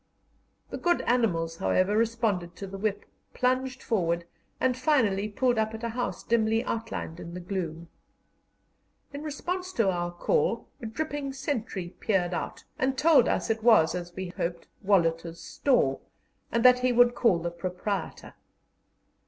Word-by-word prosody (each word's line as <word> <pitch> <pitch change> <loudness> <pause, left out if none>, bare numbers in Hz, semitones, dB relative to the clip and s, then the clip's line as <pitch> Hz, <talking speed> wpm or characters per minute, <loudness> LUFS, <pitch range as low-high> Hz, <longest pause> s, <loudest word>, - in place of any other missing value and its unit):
The - - -4
good 350 0 +2
animals, 170 -10 +1
however, 185 - +2
responded 220 -6 0
to 200 - -6
the 195 0 -8
whip, 205 0 -1 0.3
plunged 255 0 0
forward, 170 -6 0 0.3
and 260 -1 +2
finally 230 -7 +2
pulled 245 +2 +1
up 220 0 0
at 220 - -9
a 235 - -1
house 245 +2 -3
dimly 225 -1 +2
outlined 225 -7 -4
in 170 0 -8
the - - -4
gloom. 175 -3 -4 1.3
In 285 - -5
response 360 +5 -4
to 210 -5 +2
our 175 -1 -2
call, 460 - 0
a 230 - -4
dripping 290 +3 -3
sentry 240 -9 -3
peered 185 -4 +1
out, - - -4 0.2
and 260 0 +1
told 305 -6 +5
us - - 0
it 225 0 -2
was, 215 -9 +5
as 175 -1 -5
we 185 -1 -4
hoped, 170 -1 -4 0.2
Wolhuter's 170 -3 +1
store, 160 - +1 0.5
and 235 +1 +1
that 250 0 +8
he 250 0 +2
would 245 0 +5
call 230 -7 +3
the 170 +1 -3
proprietor. 185 +2 -4
220 Hz, 155 wpm, -28 LUFS, 175-250 Hz, 1.3 s, that